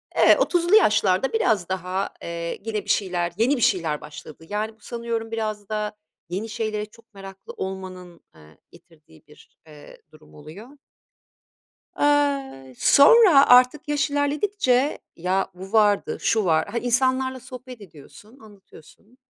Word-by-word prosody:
e -, -, +6 dB
30'lu 350 Hz, +2 st, +2 dB
yaşlarda 210 Hz, -, +3 dB
biraz 215 Hz, -, 0 dB
daha, 190 Hz, +1 st, -3 dB
eee, 170 Hz, 0 st, -5 dB
gene 215 Hz, -1 st, -5 dB
bir -, -, -12 dB
şeyler, 175 Hz, -3 st, -1 dB
yeni 240 Hz, +6 st, +2 dB
bir -, -, -5 dB
şeyler 170 Hz, -10 st, 0 dB
başladı. 150 Hz, +1 st, -12 dB
Yani 215 Hz, +1 st, -3 dB
bu -, -, -35 dB
sanıyorum 230 Hz, 0 st, -5 dB
biraz 215 Hz, -3 st, -4 dB
da 210 Hz, 0 st, -3 dB, 0.4 s
yeni 200 Hz, +6 st, -4 dB
şeylere 215 Hz, -1 st, -3 dB
çok 230 Hz, +1 st, -23 dB
meraklı 195 Hz, -1 st, -12 dB
olmanın, 185 Hz, -2 st, -8 dB
ııı, 75 Hz, -1 st, -19 dB
getirdiği 155 Hz, -, -21 dB
bir, -, -, -21 dB
eee, 150 Hz, -1 st, -15 dB
durum 155 Hz, 0 st, -20 dB
oluyor. 160 Hz, -, -12 dB, 1.3 s
Iıı, 280 Hz, -, 0 dB
sonra 315 Hz, -2 st, +6 dB
artık 255 Hz, +5 st, +4 dB
yaş 295 Hz, 0 st, 0 dB
ilerledikçe 285 Hz, -1 st, 0 dB, 0.2 s
ya 185 Hz, +3 st, -2 dB
bu 190 Hz, +2 st, -11 dB
vardı, 210 Hz, -2 st, +2 dB
şu 220 Hz, -3 st, +1 dB
var, 160 Hz, -2 st, +1 dB
ha, 230 Hz, +4 st, -5 dB
insanlarla 260 Hz, +2 st, 0 dB
sohbet 255 Hz, -1 st, -11 dB
ediyorsun, 200 Hz, -, -16 dB
anlatıyorsun 205 Hz, -, -19 dB
215 Hz, 135 wpm, -23 LUFS, 180-255 Hz, 1.3 s, e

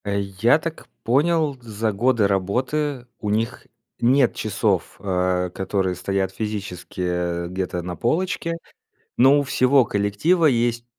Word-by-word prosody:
Э, 100 Hz, 0 st, 0 dB
я 100 Hz, +7 st, +2 dB
так 165 Hz, 0 st, -6 dB, 0.2 s
понял, 150 Hz, +3 st, +2 dB
за 110 Hz, -1 st, -2 dB
годы 115 Hz, 0 st, +2 dB
работы 125 Hz, +8 st, -1 dB
у 105 Hz, -, -3 dB
них 115 Hz, +4 st, -2 dB, 0.3 s
нет 125 Hz, +1 st, +3 dB
часов, 100 Hz, -3 st, -1 dB
э, 90 Hz, -2 st, 0 dB
которые 95 Hz, -1 st, -1 dB
стоят 95 Hz, +1 st, -1 dB
физически, 100 Hz, -3 st, -5 dB
э, 90 Hz, -1 st, -1 dB
где-то 90 Hz, -1 st, -3 dB
на 90 Hz, 0 st, -5 dB
полочке. 165 Hz, -, -1 dB, 0.6 s
Но 135 Hz, +4 st, +6 dB
у -, -, +2 dB
всего 135 Hz, -1 st, +3 dB
коллектива 105 Hz, -, +1 dB
есть 120 Hz, -3 st, +1 dB
110 Hz, 130 wpm, -22 LUFS, 95-130 Hz, 0.6 s, Но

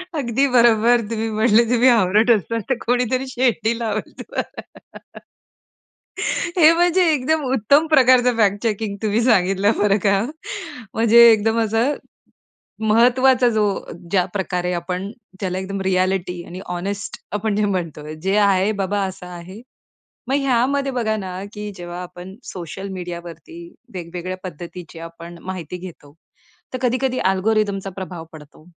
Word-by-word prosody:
अगदी 270 Hz, -1 st, +1 dB
बरोबर. 235 Hz, 0 st, +5 dB
तुम्ही 225 Hz, 0 st, -2 dB
म्हटले, 220 Hz, +1 st, +4 dB
तुम्ही 245 Hz, +1 st, +4 dB
हावरट 215 Hz, 0 st, +3 dB
असणार 230 Hz, +1 st, +1 dB
तर 260 Hz, -, +2 dB
कोणीतरी 250 Hz, +2 st, 0 dB
शेंडी 240 Hz, -3 st, 0 dB
लावेल 215 Hz, -2 st, -3 dB
तुम्हाला. -, -, -5 dB, 2.0 s
हे 320 Hz, -2 st, +8 dB
म्हणजे 350 Hz, +2 st, +3 dB
एकदम 300 Hz, +3 st, 0 dB
उत्तम 280 Hz, +7 st, +3 dB
प्रकारचं 255 Hz, -3 st, +5 dB
फॅक्ट 205 Hz, -2 st, +2 dB
चेकिंग 215 Hz, -2 st, -1 dB
तुम्ही 215 Hz, +1 st, +1 dB
सांगितलं 195 Hz, -3 st, +3 dB
बरं 205 Hz, -1 st, +3 dB
का. 195 Hz, -1 st, +3 dB, 0.7 s
म्हणजे 230 Hz, +1 st, +7 dB
एकदम 225 Hz, +1 st, +2 dB
असं, 225 Hz, +6 st, +1 dB, 0.9 s
महत्वाचा 250 Hz, +3 st, +4 dB
जो 215 Hz, -2 st, +1 dB, 0.5 s
ज्या 185 Hz, -3 st, +3 dB
प्रकारे 180 Hz, -2 st, -2 dB
आपण, 180 Hz, +3 st, -4 dB, 0.3 s
त्याला 185 Hz, -1 st, -2 dB
एकदम 195 Hz, +1 st, -4 dB
रिएलिटी 185 Hz, -1 st, 0 dB
आणि 180 Hz, +2 st, -9 dB
हॉनेस्ट 185 Hz, +2 st, -4 dB, 0.2 s
आपण 210 Hz, 0 st, -1 dB
जे 210 Hz, 0 st, +1 dB
म्हणतोय, 160 Hz, -6 st, -4 dB
"जे 190 Hz, +5 st, -1 dB
आहे 200 Hz, -1 st, +3 dB
बाबा 200 Hz, +1 st, -1 dB
असं 185 Hz, -1 st, -9 dB
आहे." 180 Hz, +4 st, -10 dB, 0.7 s
मग 270 Hz, -, +2 dB
ह्यामध्ये 275 Hz, +2 st, +1 dB
बघा 225 Hz, -3 st, 0 dB
ना 190 Hz, -2 st, -6 dB
की 210 Hz, 0 st, -6 dB
जेव्हा 175 Hz, -1 st, -7 dB
आपण 180 Hz, +1 st, -10 dB
सोशल 185 Hz, +2 st, -7 dB
मीडियावरती, 170 Hz, -2 st, -8 dB, 0.4 s
वेगवेगळ्या 180 Hz, +1 st, -5 dB
पद्धतीची 175 Hz, -1 st, -9 dB
आपण 170 Hz, +1 st, -10 dB
माहिती 180 Hz, -2 st, -6 dB
घेतो. 170 Hz, -5 st, -11 dB, 0.6 s
तर -, -, -1 dB
कधी-कधी 255 Hz, +1 st, 0 dB
अल्गोरिथमचा 200 Hz, 0 st, 0 dB
प्रभाव 180 Hz, -3 st, -6 dB
पडतो. 155 Hz, 0 st, -14 dB
205 Hz, 130 wpm, -21 LUFS, 180-235 Hz, 2.0 s, हे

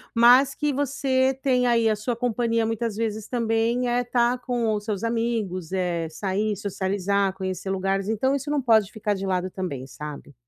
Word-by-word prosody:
mas 250 Hz, +4 st, +6 dB
que 295 Hz, -2 st, 0 dB
você 265 Hz, -1 st, +1 dB
tem 250 Hz, -2 st, +2 dB
aí 230 Hz, -1 st, +3 dB
a 215 Hz, -, +3 dB
sua 225 Hz, +3 st, -3 dB
companhia, 230 Hz, -1 st, 0 dB
muitas 225 Hz, -1 st, -2 dB
vezes, 220 Hz, -1 st, -3 dB
também, 230 Hz, +1 st, 0 dB
é 245 Hz, +1 st, +1 dB
estar 245 Hz, 0 st, +1 dB
com 240 Hz, -3 st, -1 dB
os 210 Hz, -1 st, -2 dB
seus 210 Hz, -1 st, -3 dB
amigos, 225 Hz, -7 st, -2 dB
eh, 175 Hz, -3 st, -1 dB
sair, 205 Hz, +5 st, -1 dB
socializar, 200 Hz, 0 st, 0 dB
conhecer 190 Hz, 0 st, -4 dB
lugares, 195 Hz, +1 st, -1 dB
então 245 Hz, +5 st, +1 dB
isso 280 Hz, +1 st, -4 dB
não 295 Hz, 0 st, +1 dB
pode 220 Hz, -4 st, +4 dB
ficar 210 Hz, -1 st, -1 dB
de 195 Hz, 0 st, -4 dB
lado 185 Hz, -1 st, -1 dB
também, 145 Hz, -9 st, -4 dB
sabe? 145 Hz, 0 st, -9 dB
220 Hz, 180 wpm, -24 LUFS, 195-245 Hz, -, mas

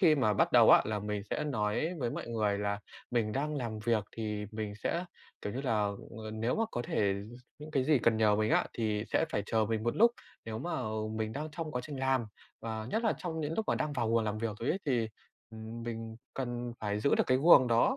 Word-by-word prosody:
khi 165 Hz, -6 st, +6 dB
mà 110 Hz, -7 st, +2 dB
bắt -, -, +2 dB
đầu -, -, +8 dB
á -, -, +8 dB
là 105 Hz, -1 st, -1 dB
mình 105 Hz, 0 st, -3 dB
sẽ 150 Hz, -, -1 dB
nói 120 Hz, +4 st, 0 dB
với 120 Hz, -4 st, -1 dB
mọi -, -, -5 dB
người 105 Hz, -3 st, 0 dB
là 100 Hz, 0 st, -1 dB, 0.3 s
mình 115 Hz, -3 st, +1 dB
đang 150 Hz, +5 st, -1 dB
làm 115 Hz, -5 st, -3 dB
việc, 115 Hz, -3 st, +2 dB
thì 105 Hz, -2 st, -3 dB
mình 105 Hz, -1 st, -4 dB
sẽ, 170 Hz, -, -2 dB, 0.4 s
kiểu 105 Hz, -, -3 dB
như 130 Hz, -, -3 dB
là, 130 Hz, -4 st, 0 dB, 0.5 s
ờ, 110 Hz, -1 st, -6 dB
nếu 115 Hz, +3 st, 0 dB
mà 225 Hz, -, +2 dB
có 120 Hz, -, -2 dB
thể 100 Hz, -4 st, +1 dB, 0.2 s
d -, -, -12 dB, 0.3 s
những 150 Hz, +1 st, -9 dB
cái 135 Hz, -4 st, +1 dB
gì 150 Hz, 0 st, +4 dB
cần 115 Hz, -1 st, +3 dB
nhờ 105 Hz, -2 st, +4 dB
mình 110 Hz, +1 st, +1 dB
á, -, -, +3 dB
thì 110 Hz, -2 st, -1 dB
sẽ -, -, +2 dB
phải 105 Hz, -, 0 dB
chờ 110 Hz, 0 st, +2 dB
mình 110 Hz, 0 st, -1 dB
một 120 Hz, +1 st, 0 dB
lúc. 235 Hz, +2 st, +7 dB, 0.3 s
Nếu 110 Hz, -1 st, -4 dB
mà 175 Hz, +9 st, -2 dB, 0.4 s
mình 110 Hz, 0 st, -2 dB
đang 150 Hz, +4 st, -4 dB
trong 155 Hz, 0 st, -4 dB
quá 125 Hz, -, -1 dB
trình 145 Hz, 0 st, -6 dB
làm, 130 Hz, -3 st, +1 dB, 0.3 s
và 110 Hz, -1 st, -4 dB
nhất 225 Hz, -, 0 dB
là 220 Hz, -, +4 dB
trong 160 Hz, -2 st, -3 dB
những 155 Hz, +1 st, -2 dB
lúc 220 Hz, -, 0 dB
mà -, -, +3 dB
đang 150 Hz, -1 st, -1 dB
vào 120 Hz, -5 st, 0 dB
guồng 115 Hz, -1 st, +3 dB
làm 105 Hz, 0 st, -2 dB
việc 110 Hz, -1 st, -2 dB
rồi 120 Hz, -, -3 dB
ấy, 185 Hz, -, +1 dB
thì, 120 Hz, -5 st, +1 dB, 0.4 s
ừm, 110 Hz, +1 st, -7 dB
mình 115 Hz, -1 st, -5 dB, 0.2 s
cần 120 Hz, -2 st, -3 dB
phải 105 Hz, -1 st, -1 dB
giữ 140 Hz, -, +3 dB
được -, -, +3 dB
cái 130 Hz, 0 st, +3 dB
guồng 140 Hz, -3 st, +8 dB
đó, 120 Hz, -, +3 dB
115 Hz, 250 wpm, -32 LUFS, 110-140 Hz, 0.5 s, đầu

